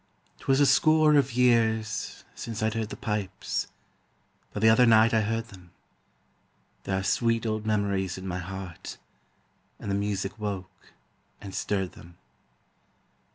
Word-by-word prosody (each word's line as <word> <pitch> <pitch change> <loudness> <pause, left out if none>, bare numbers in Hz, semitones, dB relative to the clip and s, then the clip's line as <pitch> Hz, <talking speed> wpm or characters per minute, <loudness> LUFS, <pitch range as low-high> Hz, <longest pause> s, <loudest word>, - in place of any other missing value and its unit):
'Twas 135 0 +2
a 145 - +6
score 155 +3 +5
of 140 -4 +3
years 110 -3 +1
since 115 -2 -5
I'd 110 0 +1
heard 110 -1 -2
the - - -6
pipes, 105 -3 -3 0.8
But 105 - -4
the 110 - +7
other 115 +2 +6
night 110 0 +6
I 110 - +4
heard 115 +2 -2
them; 90 -3 -15 1.1
There 95 - 0
are 95 - -2
sweet 115 +2 +1
old 110 -1 -2
memories 100 -4 0
in 95 - -8
my 90 -1 -3
heart, 95 -1 -7 0.8
And 100 - -5
the - - +1
music 100 +1 -2
woke 95 -2 -6 0.5
and 100 -2 -9
stirred 95 -2 -1
them. 85 0 -15
105 Hz, 145 wpm, -27 LUFS, 95-115 Hz, 1.1 s, the